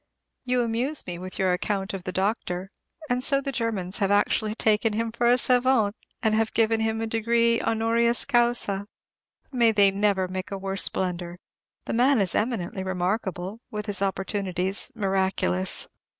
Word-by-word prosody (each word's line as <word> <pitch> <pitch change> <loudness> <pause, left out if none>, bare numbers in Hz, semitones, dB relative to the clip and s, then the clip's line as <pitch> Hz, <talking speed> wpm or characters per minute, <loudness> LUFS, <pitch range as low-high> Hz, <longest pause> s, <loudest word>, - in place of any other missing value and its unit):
You 250 -1 +1
amuse 240 +6 +1
me 175 -1 -6
with 185 +1 -8
your 185 -1 +2
account 195 +2 -2
of 190 -2 -6
the 185 - -3
doctor; 190 -1 -2 0.4
and 250 -1 0
so 275 0 +3
the 275 0 -3
Germans 220 -6 -3
have 195 -2 +1
actually 210 +1 +2
taken 220 -1 +2
him 225 +1 -1
for 235 +1 0
a 245 +1 +5
savant, 250 -4 +2 0.3
and 220 0 +1
given 225 0 +2
him 220 0 -1
a - - -1
degree 230 +1 +2
"honoris 230 +1 +1
causa." 235 -6 +1 0.6
May 235 -4 +4
they 200 -2 +4
never 195 -1 +1
make 185 0 -5
a 195 - -4
worse 195 0 -1
blunder. 175 -1 -3 0.5
The - - -3
man 250 +2 +4
is 195 -3 +1
eminently 210 -5 -1
remarkable, 190 +1 -2
with 210 -1 -5
his 205 -3 0
opportunities, 195 -1 -1
miraculous. 190 - 0
210 Hz, 160 wpm, -25 LUFS, 190-230 Hz, 0.6 s, a